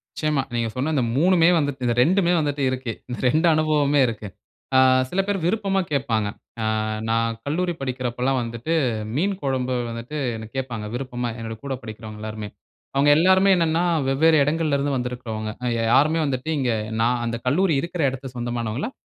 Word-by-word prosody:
நிச்சயமா. 150 -3 0
நீங்க 115 -1 0
சொன்ன 135 +5 -1
இந்த 130 - +2
3 175 +3 +4
வந்துட் 145 -3 -2
இந்த 120 - +2
2 180 +3 +2
வந்துட்டு 145 -2 -1
இருக்கு. 130 -2 -3 0.2
இந்த 120 - -5
2 155 +6 +3
அனுபவமே 150 -2 +2
இருக்கு 110 -2 -6 0.5
ஆ - - +7 0.3
சில 185 - -2
பேர் 205 -1 0
விருப்பமா 195 0 +1
கேட்பாங்க. 115 -7 0 0.3
ஆ - - -1 0.5
நான் 115 0 0
கல்லூரி 175 +5 -1
படிக்கிறபோல்லாம் 130 0 -1
வந்துட்டு 120 +7 -3 0.4
மீன் 190 +8 +1
குழம்பு 130 -2 -1
வந்துட்டு 115 +6 -6 0.2
என்ன 110 -1 -7
கேட்பாங்க. 120 -5 -4
விருப்பமா? 125 -1 -3
என்னோட 115 0 -5
கூட 140 -1 -3
படிக்கிறவங்க 110 -1 -8
எல்லாருமே. 110 -1 -5 0.5
அவுங்க 140 +1 +4
எல்லோருமே 190 +3 +5
என்னன்னா, 165 0 +1 0.2
வெவ்வேறு 155 +4 +4
இடங்கள்ல 155 0 +1
இருந்து 140 0 -1
வந்திருக்கிறவங்க. 120 -3 -4
அ - - -1
யா 115 - 0
யாருமே 155 +4 +4
வந்துட்டு 135 +2 -2
இங்க, 130 -3 +1 0.3
நான் 120 +2 +2
அந்த 115 0 -2
கல்லூரி 160 +7 +2
இருக்கிற 170 0 -4
இடத்தில 135 +1 -7
சொந்தமானவங்கல்ல. 120 - -3
135 Hz, 165 wpm, -23 LUFS, 120-155 Hz, 0.5 s, ஆ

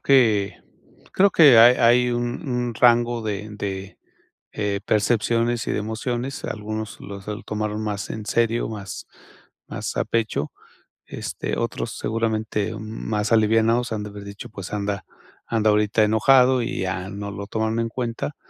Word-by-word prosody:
que 110 -8 +3 0.5
creo 195 +1 +4
que 145 -9 +7
hay 120 +2 +8
hay 120 +1 +4
un 120 +5 -3
un 125 -2 -1
rango 120 0 +3
de 105 -1 -4
de, 100 -2 -5 0.6
eh, 100 -1 -2
percepciones 115 +2 +1
y - - -1
de - - -1
emociones, 120 +5 -3
algunos 110 0 -5
los 100 -1 -9
el 105 +2 -5
tomaron 105 0 -3
más 105 -2 -3
en 110 -1 -5
serio, 115 +2 +1
más 100 -3 -7 0.6
más - - -5
a - - +1
pecho. 110 -10 -1 0.5
Este, - - -5
otros - - -3
seguramente 110 -2 -1
m 110 - -6
más 110 0 -3
alivianados 115 +2 +3
han 110 -1 -2
de 105 - -6
haber 100 0 -9
dicho: 100 0 -9
"Pues 100 -3 -8
anda, 100 -2 -2 0.4
anda 110 -2 +2
ahorita 105 +1 +3
enojado". 125 +4 +4
Y 115 - -3
ya 95 0 -3
no 100 0 -6
lo 100 0 -6
toman 110 +1 -1
en 115 0 -1
cuenta, 120 +4 -4
110 Hz, 155 wpm, -23 LUFS, 105-120 Hz, 0.6 s, hay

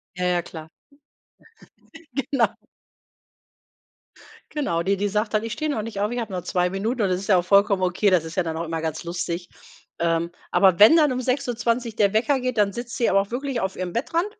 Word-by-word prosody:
Ja, 180 - -3
ja, 175 -1 +1
klar. 160 -2 -10 1.5
Genau. 270 -2 +1 2.1
Genau, 170 - -1
die 195 +3 +1
die 205 +1 -1
sagt 210 +2 -1
dann: 215 - +1
„Ich 225 - -4
stehe 310 +3 -2
noch 220 -7 -2
nicht 215 -3 -5
auf, 205 +1 0
ich 245 - -3
habe 220 -4 -4
noch 180 -2 -3
2 180 -2 0
Minuten.“ 220 +5 -2
Und 200 - +2
das 185 0 0
ist 200 - -8
ja 190 - +5
auch 175 - +1
vollkommen 200 0 +3
okay, 185 +3 +2
das 180 -4 +3
ist 160 0 -8
ja 185 - +3
dann 160 -1 -4
auch 165 - -3
immer 165 -1 -3
ganz 160 +1 -4
lustig. 170 0 -4 0.5
Ähm, 170 0 0 0.2
aber 190 -2 +4
wenn 220 +10 +9
dann 300 -5 +4
um 255 - -2
6:20 245 -3 -1
der 205 -2 +2
Wecker 260 +5 +2
geht, 255 -2 -2
dann 200 -1 +3
sitzt 240 +2 -6
sie 235 - +1
aber 195 +1 +4
auch 195 - -5
wirklich 260 0 -3
auf 190 -2 -3
ihrem 180 -1 -4
Bettrand 330 - -1
200 Hz, 215 wpm, -23 LUFS, 180-240 Hz, 2.1 s, wenn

